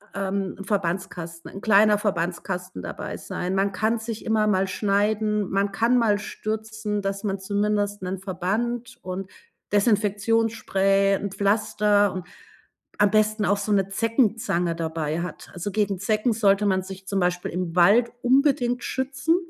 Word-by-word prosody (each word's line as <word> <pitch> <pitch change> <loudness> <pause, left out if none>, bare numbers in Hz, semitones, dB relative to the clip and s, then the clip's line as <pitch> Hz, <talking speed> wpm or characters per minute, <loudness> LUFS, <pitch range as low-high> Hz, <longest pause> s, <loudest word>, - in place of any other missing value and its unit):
ähm, 195 -1 -2
'n 195 - -7
Verbandskasten 175 -4 -3
'n 195 - -9
kleiner 210 0 +5
Verbandskasten 180 - -3
dabei - - -6
sein. 180 +1 -4
Man 195 +1 +1
kann 220 +4 0
sich 225 0 -6
immer 220 -1 +2
mal 190 -2 +2
schneiden, 210 +1 0
man 200 +1 0
kann 230 +5 +2
mal 220 -4 +3
stürzen, 215 0 -4
dass 195 +1 -3
man 195 -2 -2
zumindest 205 +1 -1
'nen 185 +1 -3
Verband 210 +6 -3
und 185 +1 -5 0.4
Desinfektionsspray, 205 -1 +2
'n 200 0 -4
Pflaster 205 0 +2
und 185 -2 -6 0.7
am 205 -1 +4
besten 215 0 +2
auch 200 - +2
so 200 +1 -3
'ne 195 -2 +2
Zeckenzange 215 -5 +1
dabei 160 -1 -2
hat. 180 - -7
Also, 180 +4 -4
gegen 205 -2 0
Zecken 215 +4 +1
sollte 205 -2 +3
man 190 -2 +2
sich 190 0 -10
zum 200 0 0
Beispiel 180 0 -1
im 175 -1 -3
Wald 205 +7 +5
unbedingt 250 -2 +2
schützen 265 +5 0
200 Hz, 150 wpm, -24 LUFS, 190-215 Hz, 0.7 s, kleiner